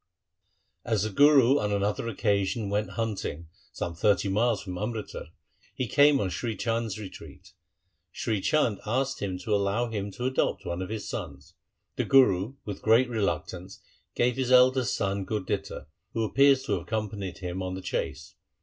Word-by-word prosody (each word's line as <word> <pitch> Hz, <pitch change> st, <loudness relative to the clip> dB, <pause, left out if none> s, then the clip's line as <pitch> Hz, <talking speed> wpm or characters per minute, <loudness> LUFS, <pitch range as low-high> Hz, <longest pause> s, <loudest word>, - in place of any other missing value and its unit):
As 110 Hz, -4 st, 0 dB
the 110 Hz, -, -2 dB
Guru 140 Hz, +2 st, +6 dB
on 105 Hz, -, -1 dB
another 100 Hz, +3 st, -1 dB
occasion 100 Hz, -1 st, 0 dB
went 105 Hz, +1 st, -1 dB
hunting 100 Hz, -8 st, -3 dB, 0.2 s
some 85 Hz, -, -4 dB
thirty 100 Hz, +3 st, +2 dB
miles 110 Hz, +1 st, +1 dB
from 90 Hz, -2 st, -6 dB
Amritsar, 110 Hz, -4 st, -5 dB, 0.5 s
he 130 Hz, -2 st, -2 dB
came 145 Hz, +5 st, +5 dB
on 95 Hz, -6 st, -1 dB
Sri 110 Hz, +5 st, -3 dB
Chand's 115 Hz, -3 st, -2 dB
retreat. 95 Hz, -2 st, -11 dB, 0.6 s
Sri 110 Hz, 0 st, -2 dB
Chand 115 Hz, -5 st, +1 dB
asked 135 Hz, +5 st, -1 dB
him 95 Hz, -2 st, -2 dB
to 105 Hz, +4 st, -3 dB
allow 100 Hz, +4 st, +1 dB
him 100 Hz, -2 st, -3 dB
to 125 Hz, -, -5 dB
adopt 130 Hz, 0 st, 0 dB
one 85 Hz, +1 st, -3 dB
of 95 Hz, -, -5 dB
his 110 Hz, -1 st, -5 dB
sons. -, -, -7 dB, 0.4 s
The -, -, 0 dB
Guru 120 Hz, -4 st, +4 dB
with 100 Hz, -2 st, -6 dB
great 115 Hz, +3 st, +4 dB
reluctance 100 Hz, -4 st, -3 dB, 0.4 s
gave 125 Hz, +1 st, +1 dB
his 130 Hz, -1 st, -1 dB
eldest 130 Hz, -1 st, +5 dB
son 95 Hz, 0 st, -1 dB
Gurditta, 105 Hz, -1 st, -3 dB, 0.3 s
who 115 Hz, -, 0 dB
appears 135 Hz, +4 st, +4 dB
to 135 Hz, -, -5 dB
have -, -, +1 dB
accompanied 105 Hz, -4 st, -4 dB
him 90 Hz, -1 st, -5 dB
to 95 Hz, 0 st, -3 dB
the 95 Hz, -, -6 dB
chase. -, -, -4 dB
105 Hz, 165 wpm, -27 LUFS, 100-120 Hz, 0.6 s, Guru